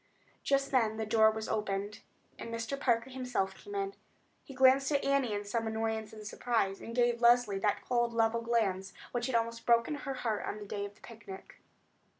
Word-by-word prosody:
Just 275 0 +1
then 225 -5 +2
the 220 - -2
door 220 0 +5
was 220 0 -4
opened, 205 -1 -2 0.4
and - - -6
Mr. 230 +3 -3
Parker 240 -1 +1
himself 250 -7 -2
came 410 - -10
in. 395 0 -2 0.5
He 270 - -11
glanced 265 +2 +5
at 285 -1 +1
Annie 275 -4 +2
in 205 0 -4
some 225 +2 -2
annoyance 220 -1 -2
and 215 -1 -10
surprise, 210 -3 -1
and 230 - -7
gave 240 -1 +2
Leslie 240 -4 +4
that 205 0 0
cold, 240 -1 +1
level 230 0 +1
glance 205 -5 0 0.2
which 240 0 -1
had 260 - -1
almost 230 0 -1
broken 235 +4 +4
her 280 -2 -4
heart 225 -4 -2
on - - -3
the 210 - -8
day 200 0 -4
of 205 0 -10
the - - -25
picnic. 210 -4 -11
230 Hz, 195 wpm, -32 LUFS, 215-245 Hz, 0.5 s, door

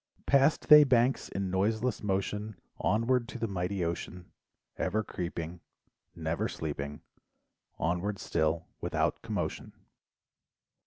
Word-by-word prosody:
Past 140 +2 +3
they 150 0 +10
banks 130 -1 +2
in 95 -1 -3
noiseless 110 +6 0
motion, 105 +1 -2 0.2
Onward 115 +4 +2
to 130 - -6
the 115 -1 -1
mighty 90 -1 -2
ocean, 85 +1 -5 0.4
Ever 105 +4 0
creeping 85 -2 -5 0.5
Never 80 -1 -1
sleeping 75 -1 -5 0.8
Onward 90 +5 -1
still 80 -1 0
without - - 0
commotion. - - -4
95 Hz, 105 wpm, -30 LUFS, 85-115 Hz, 0.8 s, they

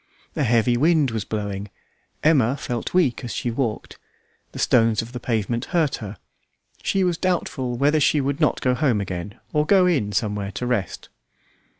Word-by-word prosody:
A - - -1
heavy 120 -1 +3
wind 155 -1 +3
was 110 -2 -3
blowing; 100 -2 -4 0.5
Emma 140 -4 +3
felt 120 -4 -4
weak 155 -9 +1
as 120 - -5
she 120 - -2
walked; 115 -3 -3 0.5
the - - -10
stones 115 -2 +3
of 115 - -11
the 125 - -6
pavement 115 +1 -1
hurt 165 -6 0
her; 105 -2 -8 0.6
she 195 - +1
was 175 -2 0
doubtful 135 -9 -1
whether 145 +4 +3
she 150 +1 +3
would 140 +2 -1
not 150 - +2
go 125 - +2
home 125 -4 +1
again, 95 0 -5 0.2
or 150 - +3
go 185 +3 +4
in 135 - +1
somewhere 100 0 -2
to 125 - -4
rest. 120 -7 -2
125 Hz, 175 wpm, -23 LUFS, 110-150 Hz, 0.6 s, go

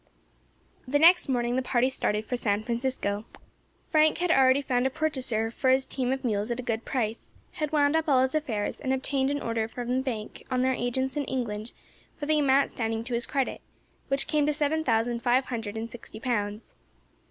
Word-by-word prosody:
The 280 +3 +2
next 335 +1 +6
morning 245 -1 0
the - - +2
party 255 -1 +2
started 215 -5 0
for 250 - -2
San 210 -3 0
Francisco. 235 -4 -2 0.7
Frank 310 -1 +4
had 350 0 +1
already 265 0 +5
found 250 -1 +1
a - - 0
purchaser 255 -6 -1
for 260 +2 0
his 260 +1 +4
team 255 -2 -2
of 265 0 -2
mules 210 -1 0
at 240 +1 -2
a - - -4
good 225 -1 -2
price, 230 -4 -3 0.2
had 305 -2 -3
wound 290 0 +3
up 320 -1 +1
all 260 -2 +5
his 260 - 0
affairs, 250 -10 -2
and 265 -2 -1
obtained 265 0 0
an 285 0 -1
order 230 -1 -1
from 245 +2 -3
the - - +1
bank 230 -5 -5
on 255 -1 +1
their 260 0 +2
agents 260 +2 -1
in 290 - -1
England 230 -4 -3 0.5
for 290 - -4
the 305 0 +2
amount 275 -1 +3
standing 225 -1 -2
to 245 +1 -5
his 235 0 0
credit, 275 -2 -1 0.5
which 275 0 +1
came 300 -2 +1
to 300 - +2
seven 300 +2 0
thousand 235 -2 +1
five 250 +2 +2
hundred 225 -3 -4
and 225 +1 -5
sixty 220 -2 -10
pounds. 210 -3 -3
255 Hz, 205 wpm, -27 LUFS, 230-275 Hz, 0.7 s, next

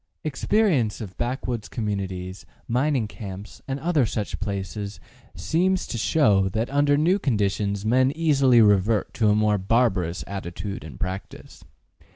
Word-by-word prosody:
Experience 150 - +1
of 100 -4 -7
backwoods 120 -2 -3
communities, 95 -4 -4 0.2
mining 125 -1 +1
camps 100 -1 -9
and 135 0 -3
other 160 -2 +2
such 105 -2 -3
places 100 0 -4 0.4
seems 185 +3 +1
to - - -5
show 105 -6 +3
that 110 +6 -2
under 145 0 +3
new 175 +7 +3
conditions 100 - 0
men 130 +4 +3
easily 140 -7 +4
revert 105 +1 +2
to 110 -2 +2
a 105 - +4
more 105 -1 +2
barbarous 95 -4 +1
attitude 95 -1 -6
and 75 -6 -10
practice. 95 +1 -6
110 Hz, 135 wpm, -24 LUFS, 100-135 Hz, 0.4 s, easily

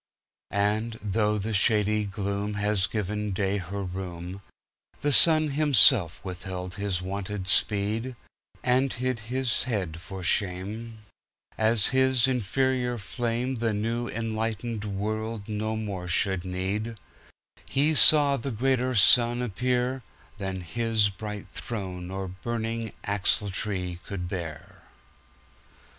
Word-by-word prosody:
And, 110 +3 -1
though 105 +1 +1
the 110 +2 -3
shady 105 0 +2
gloomHad 100 0 -1
given 105 -1 -2
day 100 +1 0
her 100 +2 -5
room, 90 0 -6 0.6
The 145 - +1
sun 155 +1 +8
himself 130 - +5
withheld 90 0 -6
his 100 -3 -2
wonted 95 0 -4
speed, 105 +7 +2 0.5
And 130 +2 +2
hid 130 -1 -2
his 130 -1 0
head 95 -10 -2
for 95 0 -8
shame, 105 +5 -2 0.5
As 110 -1 +2
his 130 -1 +4
inferior 125 +1 0
flameThe 115 +1 -2
new 115 +3 -2
enlightened 115 -1 -3
world 110 +1 -3
no 110 +1 -2
more 100 -5 -4
should 90 +1 +1
need:He 110 +9 -3
saw 145 -2 +7
a 140 - -1
greater 130 +1 0
Sun 120 +4 +5
appearThan 120 -5 -3
his 110 +3 +1
bright 105 +1 -7
throne 90 -5 -5
or 95 0 -4
burning 115 +3 -4
axletree 100 -2 -1
could 90 -2 -5
bear. 85 -5 -7
105 Hz, 105 wpm, -27 LUFS, 95-120 Hz, 0.6 s, sun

